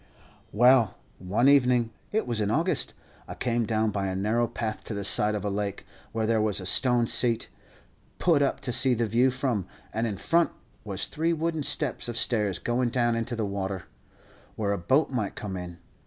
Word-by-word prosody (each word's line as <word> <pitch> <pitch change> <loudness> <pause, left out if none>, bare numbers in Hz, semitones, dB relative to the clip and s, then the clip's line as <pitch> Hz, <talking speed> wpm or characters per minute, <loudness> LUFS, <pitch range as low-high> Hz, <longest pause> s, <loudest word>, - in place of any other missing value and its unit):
"Well, 120 -2 +5 0.2
one 100 +8 +1
evening 125 -4 +4 0.2
it 220 +1 0
was 115 -3 -1
in 105 - 0
August 165 - 0 0.3
I - - -7
came 120 -2 -1
down 110 -1 +1
by 100 -1 -2
a 95 - -2
narrow 110 +5 +1
path 110 -1 -4
to 110 - -5
the 100 - -3
side 105 +2 +2
of 105 -1 -4
a - - 0
lake, 100 -1 -3 0.3
where 110 -1 -1
there 110 0 +2
was 105 -2 0
a 95 - -7
stone 120 +4 +4
seat, 115 0 +2 0.7
put 165 -5 +3
up 140 - 0
to 125 - -3
see 130 +1 +3
the 115 0 0
view 120 +4 +3
from, 125 -7 -2 0.3
and 115 +2 0
in 105 -3 -4
front 170 - +2 0.3
was 100 -2 -2
three 165 +2 -1
wooden 165 0 -1
steps 145 -2 -1
of 120 - -4
stairs 105 -6 0
going 120 +4 0
down 120 -1 +1
into 115 +1 -2
the 110 -2 -1
water, 95 -2 -3 0.7
where 105 -2 -1
a 100 - -2
boat 135 - +2
might 115 -6 -2
come 100 -3 -5
in. 90 -1 -7
115 Hz, 200 wpm, -27 LUFS, 105-125 Hz, 0.7 s, Well